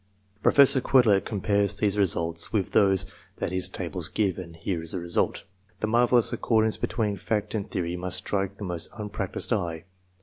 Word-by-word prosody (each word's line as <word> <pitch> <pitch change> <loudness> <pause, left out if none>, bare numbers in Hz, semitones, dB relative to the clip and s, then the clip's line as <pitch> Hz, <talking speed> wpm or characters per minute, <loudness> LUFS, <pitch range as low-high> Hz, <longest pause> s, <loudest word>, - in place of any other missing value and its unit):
Professor 140 +1 +5
Quetelet 115 -8 +3
compares 100 0 +1
these 105 -1 0
results 85 -4 +1
with 100 -4 -1
those 95 -2 +3 0.3
that 90 - -3
his 95 0 +2
tables - - -3
give, 100 -4 -1
and 85 -2 -9
here 85 0 -3
is 80 0 +1
the 95 - -2
result. 85 0 -1 0.4
The - - -1
marvellous 120 +1 +3
accordance 110 -2 +1
between 105 -4 -2
fact 105 +2 -2
and 105 -3 -3
theory 90 -3 -3
must 90 +1 -2
strike 100 0 -2
the - - -8
most 90 -3 -4
unpractised 105 +1 -3
eye. 85 -6 -3
100 Hz, 170 wpm, -26 LUFS, 90-110 Hz, 0.4 s, Professor